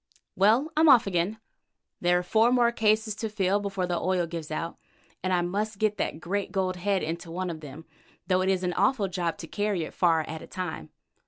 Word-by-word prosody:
Well, 230 Hz, +11 st, +3 dB
I'm 315 Hz, 0 st, +5 dB
off 245 Hz, -3 st, +7 dB
again. 190 Hz, +2 st, -1 dB, 0.6 s
There 175 Hz, 0 st, +3 dB
are 180 Hz, -, -1 dB
four 220 Hz, +6 st, +3 dB
more 240 Hz, -1 st, +4 dB
cases 215 Hz, -1 st, +2 dB
to 220 Hz, -, -3 dB
fill 200 Hz, -1 st, +1 dB
before 195 Hz, -2 st, -2 dB
the 175 Hz, -1 st, -1 dB
oil 185 Hz, -1 st, +1 dB
gives 165 Hz, -2 st, -6 dB
out, 165 Hz, +2 st, -4 dB, 0.4 s
and 185 Hz, -, -1 dB
I 175 Hz, -1 st, +2 dB
must 205 Hz, +4 st, -2 dB
get 210 Hz, 0 st, +1 dB
that -, -, -2 dB
great 195 Hz, +4 st, -3 dB
gold 185 Hz, -2 st, -1 dB
head 195 Hz, +1 st, 0 dB
into 165 Hz, +2 st, -4 dB
one 180 Hz, +1 st, -3 dB
of 160 Hz, -, -7 dB
them, 150 Hz, +1 st, -10 dB, 0.4 s
though 185 Hz, -1 st, +2 dB
it 190 Hz, -, +1 dB
is 190 Hz, -1 st, +1 dB
an 180 Hz, -1 st, 0 dB
awful 205 Hz, +2 st, +2 dB
job 175 Hz, -3 st, -2 dB
to 165 Hz, -, -8 dB
carry 205 Hz, -3 st, -1 dB
it -, -, -7 dB
far 165 Hz, -3 st, +3 dB
at 160 Hz, 0 st, -7 dB
a -, -, -10 dB
time. 165 Hz, -, -5 dB
185 Hz, 220 wpm, -27 LUFS, 175-210 Hz, 0.6 s, off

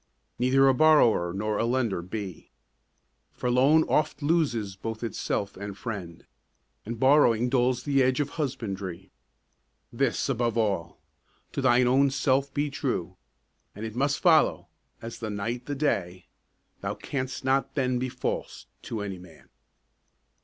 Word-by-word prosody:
Neither 135 Hz, +2 st, +4 dB
a 135 Hz, -, +5 dB
borrower 125 Hz, -, +4 dB
nor 105 Hz, +3 st, -2 dB
a -, -, +1 dB
lender 120 Hz, -7 st, 0 dB
be; 95 Hz, -1 st, -7 dB, 0.8 s
For 125 Hz, -, -2 dB
loan 140 Hz, +6 st, +5 dB
oft 155 Hz, -1 st, 0 dB
loses 135 Hz, -, 0 dB
both 110 Hz, +4 st, -6 dB
itself 100 Hz, -2 st, -3 dB
and 100 Hz, 0 st, -7 dB
friend, 95 Hz, -5 st, -7 dB, 0.6 s
And 115 Hz, 0 st, -5 dB
borrowing 125 Hz, -3 st, +4 dB
dulls 125 Hz, -1 st, +1 dB
the 140 Hz, -1 st, +2 dB
edge 130 Hz, +1 st, +2 dB
of 145 Hz, -1 st, 0 dB
husbandry. 95 Hz, -, -4 dB, 0.8 s
This -, -, 0 dB
above 120 Hz, -1 st, 0 dB
all: 100 Hz, -7 st, -1 dB, 0.5 s
To -, -, -3 dB
thine 125 Hz, -1 st, +4 dB
own 135 Hz, +2 st, +4 dB
self 135 Hz, 0 st, +1 dB
be 145 Hz, 0 st, -1 dB
true, 95 Hz, -, -3 dB, 0.6 s
And 105 Hz, +2 st, -6 dB
it 110 Hz, 0 st, -6 dB
must 140 Hz, +3 st, 0 dB
follow, 165 Hz, -4 st, +3 dB, 0.3 s
as 115 Hz, 0 st, -7 dB
the 110 Hz, -, -4 dB
night 115 Hz, +4 st, -4 dB
the 145 Hz, -, -2 dB
day, 95 Hz, -, -1 dB, 0.5 s
Thou -, -, -3 dB
canst 130 Hz, -1 st, -5 dB
not 135 Hz, +1 st, +1 dB
then 130 Hz, -3 st, 0 dB
be 130 Hz, +1 st, -2 dB
false -, -, -4 dB, 0.2 s
to 110 Hz, -3 st, -5 dB
any 100 Hz, -3 st, -5 dB
man. 85 Hz, -3 st, -16 dB
120 Hz, 145 wpm, -27 LUFS, 100-135 Hz, 0.8 s, a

